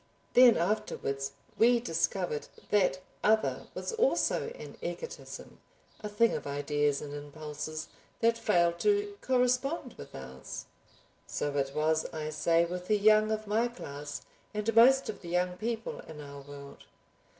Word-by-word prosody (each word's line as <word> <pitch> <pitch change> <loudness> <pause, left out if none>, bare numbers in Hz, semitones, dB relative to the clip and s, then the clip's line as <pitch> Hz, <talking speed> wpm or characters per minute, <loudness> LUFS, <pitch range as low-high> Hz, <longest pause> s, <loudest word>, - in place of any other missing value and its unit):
Then 245 -2 +8
afterwards 140 -7 -1 0.3
we 240 +1 +6
discovered 175 -5 -1 0.2
that 185 -2 +3 0.2
other 220 +1 +2
was - - -3
also 460 0 +2
an - - -9
egotism, 480 - -7 0.4
a 210 - -5
thing 230 +3 +3
of - - -4
ideas 145 0 0
and 145 -1 -7
impulses, 150 +1 -6 0.3
that 230 0 +4
failed 175 -7 +2
to 410 0 +2
correspond 255 +2 +1
with - - -10
ours. 65 0 -8 0.6
So 145 -1 -2
it 135 0 -1
was, 155 +1 +2
I 155 -1 -4
say, 165 +2 +3
with 180 +1 -5
the 210 - +3
young 215 +1 +5
of 215 0 -1
my 220 +3 +2
class 145 -11 -7 0.3
and 210 +1 -1
most 265 +4 +7
of - - -5
the 170 - -8
young 180 +1 +1
people 225 +1 -3
in 160 -2 -10
our 140 -1 -9
world. 140 0 -11
180 Hz, 145 wpm, -30 LUFS, 150-230 Hz, 0.6 s, Then